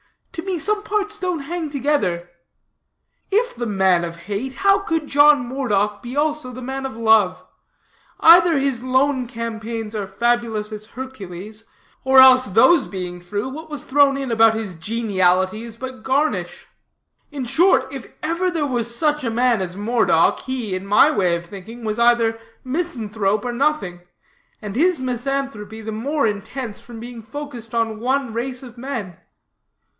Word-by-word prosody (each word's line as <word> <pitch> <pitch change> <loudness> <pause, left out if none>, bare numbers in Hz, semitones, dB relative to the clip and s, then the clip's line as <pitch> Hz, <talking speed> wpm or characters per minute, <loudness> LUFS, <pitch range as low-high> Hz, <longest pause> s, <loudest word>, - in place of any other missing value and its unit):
To 330 - -5
me 370 0 -3
some 420 +6 0
parts 420 0 -2
don't 360 -3 -1
hang 325 +2 -4
together. 255 -12 -1 1.0
If 455 +5 +1
the 240 0 -3
man 190 -4 +2
of 170 -1 -5
hate, 205 +9 -5
how 395 0 +3
could 325 -5 -2
John 290 -2 +5
Moredock 210 -6 -1
be 245 +2 -7
also 300 -3 0
the 255 +1 -9
man 265 +1 -4
of 260 -4 -6
love? 220 -5 +3 0.7
Either 335 -1 +7
his 270 -3 0
lone 260 0 +1
campaigns 225 -2 -5
are 205 -3 -3
fabulous 225 +1 -1
as 215 0 -8
Hercules'; 220 -4 -9 0.4
or 265 0 +3
else, 255 -1 +8
those 225 - +4
being 180 -2 -6
true, 205 +7 -4
what 315 +4 -9
was 295 -1 -5
thrown 275 0 +3
in 270 -3 -3
about 225 0 +5
his 220 -4 -4
geniality 190 +1 0
is 230 -1 -9
but 260 +1 -7
garnish. 280 +4 -1 0.6
In 280 -4 -5
short, 335 +1 +3
if 270 -3 -7 0.2
ever 335 +4 0
there 325 -4 -1
was 235 -4 -2
such 300 +2 0
a 235 - 0
man 235 -1 +2
as 180 0 -5
Moredock, 210 -6 +2
he, 250 -6 -4
in 185 +1 -4
my 205 - +5
way 180 -4 +1
of 170 0 -6
thinking, 205 +6 -10
was 215 +1 -2
either 235 -1 +3 0.2
misanthrope 225 - -2
or 245 - -2
nothing; 250 -10 -1 0.6
and 205 -1 -6
his 340 +4 +2
misanthropy 250 -4 -3
the 220 0 -5
more 275 +7 -1
intense 215 +2 -4
from 235 -2 -11
being 235 0 -8
focused 240 -2 -8
on 225 -1 0
one 260 0 -1
race 250 +2 -3
of 240 -2 -12
men. 235 - -5
240 Hz, 160 wpm, -21 LUFS, 210-275 Hz, 1.0 s, else